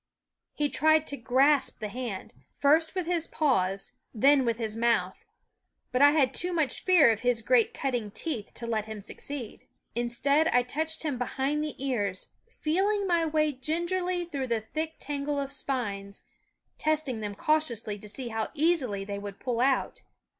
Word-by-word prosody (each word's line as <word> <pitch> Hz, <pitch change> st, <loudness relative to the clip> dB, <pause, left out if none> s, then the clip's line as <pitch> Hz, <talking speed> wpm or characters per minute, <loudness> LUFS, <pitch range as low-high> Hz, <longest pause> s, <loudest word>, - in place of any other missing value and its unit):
He 295 Hz, -, +1 dB
tried 315 Hz, +1 st, +3 dB
to 285 Hz, -, -4 dB
grasp 275 Hz, +3 st, +2 dB
the 215 Hz, -, -3 dB
hand, 230 Hz, -3 st, -5 dB, 0.2 s
first 320 Hz, +5 st, +3 dB
with 370 Hz, -2 st, -1 dB
his 335 Hz, -1 st, 0 dB
paws, 195 Hz, -10 st, 0 dB, 0.2 s
then 270 Hz, +4 st, +5 dB
with 230 Hz, -1 st, 0 dB
his 220 Hz, -2 st, -3 dB
mouth; 235 Hz, 0 st, 0 dB, 0.7 s
but 250 Hz, -, +1 dB
I 285 Hz, -, +9 dB
had 275 Hz, -5 st, +3 dB
too 360 Hz, +1 st, 0 dB
much 315 Hz, -5 st, 0 dB
fear 350 Hz, -10 st, +6 dB
of 220 Hz, -, -1 dB
his 245 Hz, -2 st, +1 dB
great 245 Hz, -2 st, +4 dB
cutting 245 Hz, -6 st, -2 dB
teeth 230 Hz, -1 st, -5 dB
to 235 Hz, -, -6 dB
let 220 Hz, -2 st, -1 dB
him 220 Hz, -1 st, -6 dB
succeed. 250 Hz, +2 st, -7 dB, 0.3 s
Instead 255 Hz, +6 st, +1 dB
I 245 Hz, -5 st, +3 dB
touched 315 Hz, +6 st, -2 dB
him 290 Hz, -6 st, -2 dB
behind 270 Hz, +4 st, -1 dB
the 305 Hz, -, -4 dB
ears, 210 Hz, -9 st, -2 dB, 0.2 s
feeling 400 Hz, +3 st, 0 dB
my 340 Hz, -3 st, +2 dB
way 305 Hz, -1 st, +2 dB
gingerly 345 Hz, +6 st, -1 dB
through 280 Hz, -6 st, -4 dB
the 230 Hz, -2 st, 0 dB
thick 315 Hz, +8 st, -4 dB
tangle 285 Hz, +1 st, -3 dB
of 275 Hz, 0 st, -4 dB
spines, 200 Hz, -8 st, -4 dB, 0.6 s
testing 305 Hz, -6 st, 0 dB
them 205 Hz, -1 st, -4 dB
cautiously 235 Hz, -7 st, 0 dB
to 210 Hz, +1 st, -11 dB
see 245 Hz, +3 st, -5 dB
how 220 Hz, -1 st, -2 dB
easily 280 Hz, -, +1 dB
they 200 Hz, 0 st, -4 dB
would 200 Hz, -1 st, -8 dB
pull 245 Hz, -2 st, -2 dB
out. 265 Hz, +1 st, +1 dB
270 Hz, 170 wpm, -28 LUFS, 230-310 Hz, 0.7 s, I